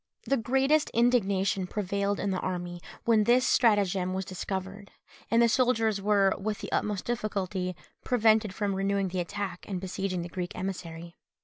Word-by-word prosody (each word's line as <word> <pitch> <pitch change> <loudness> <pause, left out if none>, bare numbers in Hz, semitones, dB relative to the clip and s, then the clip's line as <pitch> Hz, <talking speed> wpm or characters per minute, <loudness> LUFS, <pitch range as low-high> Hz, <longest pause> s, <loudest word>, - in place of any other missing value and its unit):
The 275 - +1
greatest 270 +5 +2
indignation 200 -6 +2
prevailed 200 +1 -1
in 200 - -1
the 185 - -1
army 175 -1 -4 0.2
when 220 -2 +4
this 250 +2 +4
stratagem 195 -5 +2
was 190 0 -2
discovered, 190 +2 -5 0.4
and 230 +1 +4
the - - +6
soldiers 225 -3 +2
were, 200 -1 +3
with 210 +1 -2
the - - -7
utmost 205 -3 -1
difficulty, 195 -6 -2 0.3
prevented 220 -4 +3
from 200 0 -2
renewing 195 0 0
the 185 0 -3
attack 185 +1 -4
and 190 -2 -2
besieging 190 -1 -3
the - - -5
Greek 180 0 -4
emissary. 170 -3 -6
200 Hz, 155 wpm, -28 LUFS, 185-220 Hz, 0.4 s, the